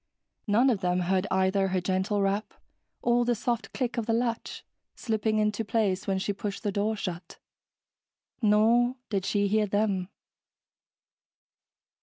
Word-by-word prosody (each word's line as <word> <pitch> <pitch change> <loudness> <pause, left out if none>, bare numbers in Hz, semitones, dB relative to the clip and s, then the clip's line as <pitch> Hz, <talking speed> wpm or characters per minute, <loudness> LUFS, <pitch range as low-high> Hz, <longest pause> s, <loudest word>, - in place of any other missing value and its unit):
None 235 +6 +4
of 215 - 0
them 180 -1 +1
heard 185 +2 +1
either 190 +1 +2
her 185 0 0
gentle 190 +3 0
rap 200 +2 -1 0.5
or 240 0 +3
the 240 0 +1
soft 235 +1 -2
click 245 -2 -2
of 225 - -4
the 225 - +2
latch 230 -1 -2 0.3
slipping 220 -1 -1
into 210 +1 +1
place 210 -3 0
when 195 -1 +1
she 195 +2 -1
pushed 200 0 -5
the 205 - 0
door 205 +3 0
shut. 180 -4 -6 1.0
Nor 230 +3 +4 0.2
did 195 -2 -1
she 205 -1 +1
hear 210 +1 +2
them. 200 -2 0
205 Hz, 145 wpm, -28 LUFS, 190-225 Hz, 1.0 s, None